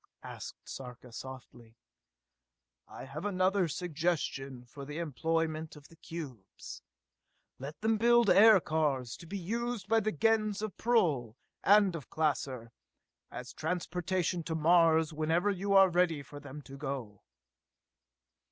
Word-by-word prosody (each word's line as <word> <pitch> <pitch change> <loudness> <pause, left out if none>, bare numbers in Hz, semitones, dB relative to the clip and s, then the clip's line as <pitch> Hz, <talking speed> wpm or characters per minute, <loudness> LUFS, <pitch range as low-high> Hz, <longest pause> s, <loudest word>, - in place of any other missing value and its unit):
said - - -9 0.2
Sarka 125 -1 -9
softly. 120 -2 -10 1.1
"I - - -9
have 140 +4 -7
another 190 -1 +2
suggestion 150 -6 -2
for 140 +3 -10
the 145 +2 -7
employment 160 +1 -2
of 145 -1 -15
the 165 - -17
cubes! 150 - -9 0.8
Let 140 +4 -7
them 220 0 +1
build 235 0 +5
aircars 160 - +4
to 170 - -12
be 200 +4 -4
used 225 +2 -3
by 225 +1 +4
the 215 0 -1
Gens 215 +3 +1
of 215 - -4
Prull 150 - +1 0.3
and 200 -2 +5
of 150 -6 -8
Klaser, 135 -6 -1 0.6
as - - -8
transportation 180 +1 -2
to 165 - -2
Mars 160 -1 +4
whenever 165 +6 +1
you 200 +1 -1
are 195 0 +8
ready 175 -4 +1
for 145 +2 -11
them 145 +1 -10
to 135 +1 -11
go!" 135 -8 -5
160 Hz, 130 wpm, -31 LUFS, 140-190 Hz, 1.1 s, are